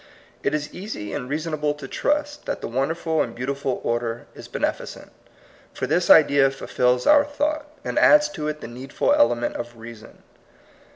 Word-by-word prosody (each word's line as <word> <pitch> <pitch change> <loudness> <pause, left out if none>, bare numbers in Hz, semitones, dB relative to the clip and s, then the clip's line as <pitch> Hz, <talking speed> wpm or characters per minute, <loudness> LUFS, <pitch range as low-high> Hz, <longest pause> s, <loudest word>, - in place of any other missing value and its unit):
It 150 - 0
is 150 -1 -4
easy 180 - -6
and 125 - -4
reasonable 150 0 -1
to 145 -2 -9
trust 295 - -1
that - - -3
the - - -4
won 130 +4 0
derful 160 -1 -1
and 115 - -3
beautiful 135 +1 -3
order 120 0 -2
is - - -11
beneficent; - - -4 0.6
for - - -2
this 175 +3 +1
idea 140 -3 +6
fulfils 125 -2 0
our 290 -1 +6
thought, 295 +1 -2 0.2
and - - -1
adds 300 0 +6
to 150 - -5
it 150 0 -4
the - - -6
needful 125 +3 -1
element 120 0 +2
of 120 0 -7
reason. 115 -1 -12
140 Hz, 170 wpm, -23 LUFS, 120-170 Hz, 0.6 s, idea